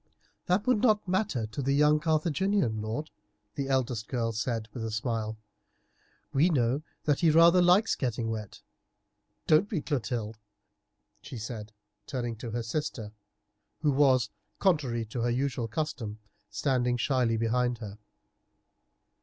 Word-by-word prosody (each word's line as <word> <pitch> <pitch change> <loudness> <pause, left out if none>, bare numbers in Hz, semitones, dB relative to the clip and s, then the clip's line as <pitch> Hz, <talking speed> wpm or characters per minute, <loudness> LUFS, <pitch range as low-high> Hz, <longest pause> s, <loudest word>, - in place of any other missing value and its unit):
"That 190 +3 +2
would 250 -4 +3
not 215 -5 +3
matter 185 - 0
to 110 +6 -5
the 140 +1 +1
young 150 +1 +4
Carthaginian 160 - +1
lord," 115 +9 -4 0.4
the 140 -2 -3
eldest 125 -4 0
girl 115 -3 -1
said 115 0 -2
with 120 - -5
a 110 - -2
smile; 110 0 -2 1.0
"we 150 +6 +4
know 130 -2 +1 0.2
that 145 -2 +1
he 170 - +4
rather 170 +3 +6
likes 180 +5 +4
getting 115 -3 -2
wet, 105 -3 -6 0.8
don't 160 +7 +4
we, 185 - -1
Clotilde?" 120 -7 -3 0.8
she 125 - -8
said, 110 -1 -6 0.4
turning 120 -5 -3
to 120 +1 -6
her 115 +1 -3
sister, 115 -3 -3 0.7
who 150 - +4
was, 130 -5 +3 0.3
contrary 135 - +1
to 115 +3 -4
her 120 - +1
usual 125 -1 -1
custom, 115 -4 -3 0.3
standing 125 +2 0
shyly 120 -1 +1
behind 120 +2 +1
her. 105 -2 -8
125 Hz, 135 wpm, -29 LUFS, 115-150 Hz, 1.0 s, rather